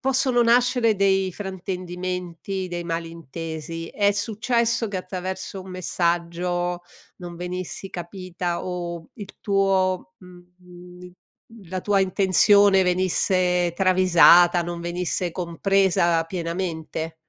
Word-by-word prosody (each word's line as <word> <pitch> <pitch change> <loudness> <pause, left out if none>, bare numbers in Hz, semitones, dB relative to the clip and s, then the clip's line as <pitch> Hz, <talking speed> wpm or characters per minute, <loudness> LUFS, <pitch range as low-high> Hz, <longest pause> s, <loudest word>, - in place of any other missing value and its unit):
possono 260 -2 +2
nascere 240 -1 +3
dei 195 -1 +2
fraintendimenti, 185 -1 -5
dei 175 -1 -5
malintesi? 165 -1 -6
È 200 -1 +2
successo 230 +2 0
che 195 -2 -3
attraverso 185 +1 -6
un 190 - -11
messaggio 175 0 -1 0.3
non 175 -1 -9
venissi 180 +2 -5
capita 175 -1 -5
o 175 -2 -5
il 205 -4 -10
tuo, 190 -2 +1
mhmm, 180 0 -15 0.6
la 185 0 -3
tua 200 0 +2
intenzione 195 +1 +4
venisse 180 -1 +1
travisata, 180 -1 +5
non 170 0 -5
venisse 175 0 -2
compresa 175 -1 +1
pienamente? 165 -2 -4
180 Hz, 95 wpm, -23 LUFS, 175-195 Hz, 0.6 s, travisata